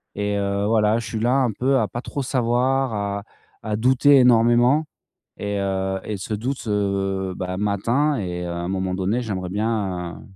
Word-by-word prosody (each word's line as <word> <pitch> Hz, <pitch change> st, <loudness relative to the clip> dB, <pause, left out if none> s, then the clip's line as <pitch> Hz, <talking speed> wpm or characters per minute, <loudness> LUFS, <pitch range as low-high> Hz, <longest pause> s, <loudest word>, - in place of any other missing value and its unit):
Et 105 Hz, 0 st, -1 dB
heu, 100 Hz, 0 st, -1 dB
voilà, 110 Hz, 0 st, +3 dB
je 115 Hz, -, -6 dB
suis 110 Hz, -, -3 dB
là 120 Hz, +3 st, +2 dB
un 130 Hz, -4 st, +2 dB
peu 130 Hz, +6 st, +1 dB
à 110 Hz, -, +1 dB
pas 120 Hz, -, -5 dB
trop 140 Hz, +1 st, -4 dB
savoir, 130 Hz, 0 st, +1 dB
à 100 Hz, -1 st, -3 dB, 0.4 s
à 105 Hz, -, -1 dB
douter 130 Hz, +5 st, +4 dB
énormément 120 Hz, +4 st, +4 dB, 0.5 s
et 100 Hz, 0 st, -3 dB
heu 95 Hz, 0 st, -1 dB
et 105 Hz, -, -3 dB
ce 95 Hz, +3 st, -6 dB
doute, 125 Hz, +5 st, -4 dB
heu, 95 Hz, -2 st, -1 dB
ben 90 Hz, 0 st, -4 dB
m'atteint 115 Hz, +9 st, +1 dB
et 90 Hz, -2 st, -4 dB
à 85 Hz, -, -4 dB
un 85 Hz, +1 st, -3 dB
moment 95 Hz, -1 st, -2 dB
donné, 95 Hz, +6 st, 0 dB
j'aimerais 95 Hz, -6 st, -4 dB
bien 100 Hz, -4 st, -2 dB
105 Hz, 180 wpm, -22 LUFS, 95-120 Hz, 0.5 s, douter